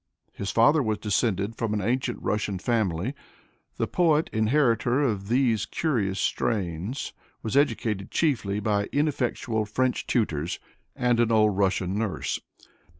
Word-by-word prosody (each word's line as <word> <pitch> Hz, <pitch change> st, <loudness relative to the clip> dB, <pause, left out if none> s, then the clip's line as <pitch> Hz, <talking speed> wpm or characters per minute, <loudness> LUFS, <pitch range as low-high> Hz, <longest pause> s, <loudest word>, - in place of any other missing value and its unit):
His 100 Hz, -, -4 dB
father 145 Hz, +7 st, +4 dB
was 110 Hz, -4 st, 0 dB
descended 105 Hz, 0 st, 0 dB
from 110 Hz, -2 st, -1 dB
an 105 Hz, -, -1 dB
ancient 120 Hz, +4 st, -1 dB
Russian 105 Hz, -2 st, -1 dB
family. 105 Hz, +1 st, 0 dB, 0.6 s
The -, -, +1 dB
poet, 160 Hz, -3 st, +2 dB
inheritor 120 Hz, +3 st, +2 dB
of 105 Hz, -7 st, -1 dB
these 120 Hz, -3 st, +2 dB
curious 105 Hz, -12 st, -1 dB
strains, 100 Hz, -, -2 dB, 0.3 s
was 110 Hz, -, -3 dB
educated 115 Hz, -8 st, +1 dB
chiefly 110 Hz, -11 st, 0 dB
by 100 Hz, -1 st, 0 dB
ineffectual 130 Hz, -7 st, 0 dB
French 125 Hz, +4 st, 0 dB
tutors 85 Hz, -, 0 dB, 0.4 s
and 120 Hz, -1 st, +2 dB
an 115 Hz, -1 st, +3 dB
old 105 Hz, -2 st, +4 dB
Russian 95 Hz, 0 st, +1 dB
nurse. 110 Hz, -4 st, -2 dB
110 Hz, 130 wpm, -26 LUFS, 100-125 Hz, 0.6 s, father